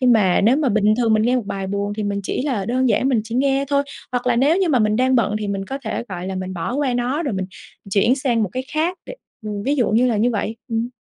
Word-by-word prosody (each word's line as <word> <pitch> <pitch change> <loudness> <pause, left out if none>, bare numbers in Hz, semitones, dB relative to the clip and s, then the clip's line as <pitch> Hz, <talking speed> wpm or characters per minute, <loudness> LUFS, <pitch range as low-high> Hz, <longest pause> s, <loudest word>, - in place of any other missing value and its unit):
Nhưng 250 -2 +5
mà 195 -5 +3
nếu 230 +6 +4
mà 295 -3 +1
bình 215 -1 +3
thường 230 -3 +3
mình 215 - +2
nghe 245 +3 +2
một 240 -5 -3
bài 195 -1 -4
buồn 200 +1 -2
thì 215 - -2
mình 200 -1 -2
chỉ 195 - -2
là 235 -9 -1
đơn 255 +3 +1
giản 255 - +2
mình 250 -5 +2
chỉ 225 +1 -6
nghe 270 +2 +2
thôi, 280 0 +2 0.3
hoặc 245 0 -2
là 245 -1 +2
nếu 285 +7 +3
như 380 -2 +1
mà 275 -5 +3
mình 215 -1 +2
đang 260 +2 +2
bận 210 -3 +1
thì 210 - -3
mình 195 -1 -2
có 270 - -4
thể, - - -3
gọi 180 -2 -5
là, 190 - -3
mình 185 0 -4
bỏ 175 +7 -3
qua 275 -3 0
nó, 250 +6 -1
rồi 275 -9 -2
mình 190 -1 -2 0.4
chuyển 220 +6 +3
sang 250 -5 0
một 210 - 0
cái 255 0 -3
khác 340 +4 0
để - - -7 0.3
ừm, 205 -1 -4
ví 280 +5 +1
dụ 245 -5 +2
như 230 +4 +3
là 235 -3 +1
như 230 +4 +2
vậy. 220 0 -2
Ừm. 230 0 -1
235 Hz, 300 wpm, -21 LUFS, 205-260 Hz, 0.4 s, Nhưng